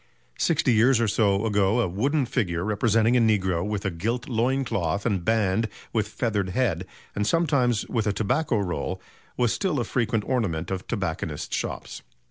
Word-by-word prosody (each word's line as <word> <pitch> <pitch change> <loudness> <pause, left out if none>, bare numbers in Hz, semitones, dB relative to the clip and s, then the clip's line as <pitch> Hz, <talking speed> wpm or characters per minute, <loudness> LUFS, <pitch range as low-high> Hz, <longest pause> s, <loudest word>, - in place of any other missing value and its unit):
Sixty 150 -6 +2
years 115 +3 +4
or 115 - +2
so 100 0 +2
ago 105 +1 +2
a 120 - +2
wooden 135 - 0
figure, 90 -9 -1
representing 110 +3 +2
a - - +5
negro 95 -6 +2
with 105 0 -3
a 100 - 0
gilt 115 +9 -2
loin 130 +3 +1
cloth 100 -1 -1
and 100 -7 0
band 110 +1 +1 0.2
with 110 -3 +1
feathered 105 -4 -1
head, 95 -5 0 0.3
and 105 0 0
sometimes 140 -9 +2
with 110 -3 -1
a - - +3
tobacco 115 +6 0
roll, 95 -1 -2 0.4
was 120 -3 +2
still 185 -8 0
a - - +1
frequent 115 -2 0
ornament 95 -10 -1
of 95 -1 -4
tobacconists' 80 -8 -3
shops. - - -5
110 Hz, 170 wpm, -25 LUFS, 95-120 Hz, 0.4 s, a